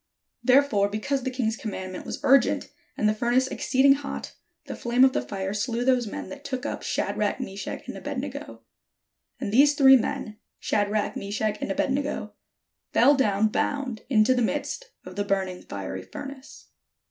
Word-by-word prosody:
Therefore 255 -7 +4
because 215 +7 -1
the 260 - -2
king's 245 -4 -1
commandment 190 -5 -6
was - - -4
urgent, 270 -1 +4 0.3
and 215 - +2
the 215 - +3
furnace 240 +4 +2
exceeding 265 +1 +3
hot, 280 0 -5 0.3
the - - -6
flame 245 +2 +4
of 265 - +3
the - - 0
fire 190 +10 -4
slew 235 +3 -1
those 255 -3 +3
men - - -6
that 285 0 -9
took 260 -3 -4
up - - -3
Shadrach, - - -1
Meshach, 200 -6 -6
and - - -6
Abed - - -5
nego. - - -6 0.8
And 205 - -3
these 285 +4 +6
three 270 -2 +8
men, 215 -2 -3 0.2
Shadrach, 205 0 0
Meshach, 210 +1 -2
and - - -3
Abed 230 - 0
nego, 280 +2 -2 0.6
fell 285 - +6
down 215 -6 +2
bound 255 -1 -2
into 225 -1 +4
the 250 - +1
midst 295 - -2 0.2
of 185 +1 -10
the 205 - +1
burning 190 -2 -1
fiery - - -6
furnace. 275 -1 -10
240 Hz, 170 wpm, -26 LUFS, 210-270 Hz, 0.8 s, three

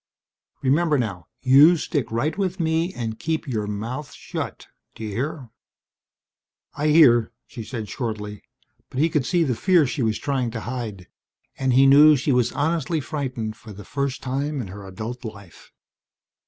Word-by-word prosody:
Remember 150 +3 +3
now 100 - -3 0.2
you 145 +7 +7
stick 145 -5 -2
right 120 +8 0
with 190 -2 -2
me 165 +2 +1
and 110 -2 -4
keep 160 0 -2
your 110 -5 -2
mouth 115 +8 -5
shut, - - -6 0.3
d'you 110 -1 -6
hear?" 130 +4 -4 1.2
"I 150 - -1
hear," 135 -8 +6
she 115 - -8
said 110 -2 -6
shortly. 105 -2 -5 0.5
But 130 - -5
he 160 +3 +3
could 150 -5 0
see 175 -2 +2
the 135 -5 0
fear 175 - +3
she 125 0 -3
was 110 -2 +1
trying 130 -4 -1
to - - -5
hide 110 -7 -5 0.5
and 130 -1 +1
he 135 +2 +6
knew 150 +3 +8
she 140 +2 0
was 125 -2 +2
honestly 160 +3 0
frightened 130 -7 -4
for 110 -3 -11
the 100 0 -11
first 140 +1 -3
time 140 +3 -2
in 110 -7 -5
her 100 +1 -9
adult 110 +7 -6
life. 100 -6 -11
130 Hz, 165 wpm, -23 LUFS, 110-150 Hz, 1.2 s, knew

